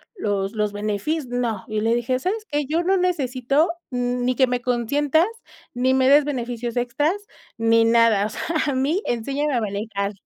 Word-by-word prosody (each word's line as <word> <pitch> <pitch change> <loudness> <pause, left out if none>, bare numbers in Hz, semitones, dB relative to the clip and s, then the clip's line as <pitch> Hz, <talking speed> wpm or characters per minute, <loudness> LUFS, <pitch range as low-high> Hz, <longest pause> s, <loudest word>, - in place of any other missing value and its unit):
los 200 - -1
los 210 -2 -1
benefis 215 +9 -2
no", 240 -4 -2
y 215 0 -2
le 230 +1 +2
dije: 240 +2 0
"¿Sabes 420 +9 -2
qué?, 295 0 0
yo 330 +3 0
no 380 +2 +2
necesito, 290 -3 +1 0.2
n 245 0 -1
ni 255 0 +1
que 260 0 +4
me 245 0 -1
consientas, 280 - +1 0.5
ni 255 +2 +1
me 260 0 +3
des 290 +1 +6
beneficios 240 -4 -3
extras, 245 +7 +1 0.4
ni 225 0 +3
nada. 230 -3 +4
O - - -7
sea, - - -7 0.3
a 280 - 0
mí 290 +9 +1
enséñame 275 +5 -1
a 235 - +1
manejar". 200 -1 -3
245 Hz, 180 wpm, -22 LUFS, 225-290 Hz, 0.5 s, des